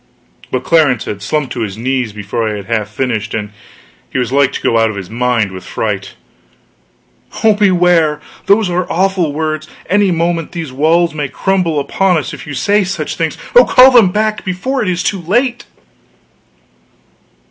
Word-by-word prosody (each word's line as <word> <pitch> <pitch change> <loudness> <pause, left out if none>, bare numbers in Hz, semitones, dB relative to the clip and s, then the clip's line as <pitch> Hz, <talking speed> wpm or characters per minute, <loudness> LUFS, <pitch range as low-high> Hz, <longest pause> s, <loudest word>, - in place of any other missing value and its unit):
But 130 0 -2
Clarence 150 -8 +2
had 100 -1 -5
slumped 145 +5 -2
to 125 - -5
his 105 -2 -4
knees 125 -1 -1
before 105 +2 -3
I 105 - -3
had 100 -2 -7
half 110 -1 -2
finished, 110 -1 -3
and 105 -1 -4 0.6
he - - -3
was 125 -1 -1
like 140 0 +3
to - - -4
go 115 - +2
out 115 0 +3
of 110 - -5
his 95 0 -7
mind 120 -3 0
with 95 -1 -9
fright. - - -4 1.3
"Oh, 220 -1 +6
beware! 180 -6 +3 0.3
These 205 +1 +4
are 180 0 -2
awful 185 -3 +1
words! 155 +1 -3 0.2
Any 200 +2 +2
moment 170 -1 -1
these 165 -6 -5
walls 165 +4 +2
may 150 -2 -3
crumble 180 -4 0
upon 180 +5 +1
us 155 - -4
if - - -9
you 145 - -5
say 205 +9 +2
such 190 +2 -4
things. - - -2 0.2
Oh - - +9
call 260 +1 +7
them 235 -7 +6
back 215 +2 -1
before 195 +9 -2
it 210 - -1
is 180 -1 -1
too 195 -3 -1
late!" 240 +8 0
155 Hz, 180 wpm, -14 LUFS, 125-190 Hz, 1.3 s, Oh